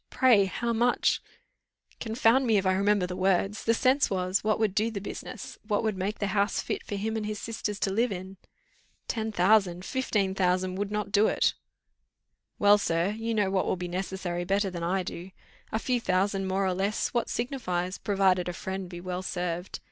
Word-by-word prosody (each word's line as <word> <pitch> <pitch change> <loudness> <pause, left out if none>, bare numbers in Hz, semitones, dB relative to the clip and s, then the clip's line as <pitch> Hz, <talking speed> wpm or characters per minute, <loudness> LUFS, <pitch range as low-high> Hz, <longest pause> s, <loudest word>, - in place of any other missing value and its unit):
Pray, 235 -7 +5
how 235 +5 -2
much 240 +2 +2 0.4
" - - -36
"Confound 230 +3 +2
me, 220 -2 +4
if 195 - 0
I 185 - +3
remember 200 0 +2
the 180 0 -5
words. 195 +2 +1
The 230 - +3
sense 265 +4 +3
was, 185 0 0
what 215 0 +2
would 220 -3 +1
do 215 +3 +1
the 215 -3 -4
business; 255 +5 -7
what 210 0 -1
would 215 -2 0
make 195 +3 -2
the 205 - -1
house 200 0 +1
fit - - -3
for 205 - -5
him 220 +3 -2
and 220 - -2
his 210 0 -3
sisters 215 -2 -4
to 195 - +1
live 230 +4 +1
in." 190 +1 -6 0.7
"Ten 220 -1 -2
thousand! 185 -2 +3
fifteen 210 -8 0
thousand 185 0 +1
would 200 0 -2
not 210 -1 -2
do." 205 +2 +4 1.3
"Well, 205 0 +6
sir. 170 -1 +1
You 225 +1 -3
know 205 -3 +1
what 190 -1 +1
will - - +1
be 180 0 -5
necessary 180 -1 -3
better 195 +2 0
than 175 -1 -5
I 185 +3 0
do. 175 +1 -7 0.4
A - - 0
few 245 +1 0
thousands 195 0 0
more 195 +1 +1
or 185 - +1
less, 195 +3 0
what 240 -2 -1
signifies, 185 -8 -2
provided 190 -3 +2
a - - -3
friend 190 +1 -5
be 175 -1 -7
well 180 0 -4
served. 175 -1 -3
195 Hz, 200 wpm, -28 LUFS, 185-220 Hz, 1.3 s, Well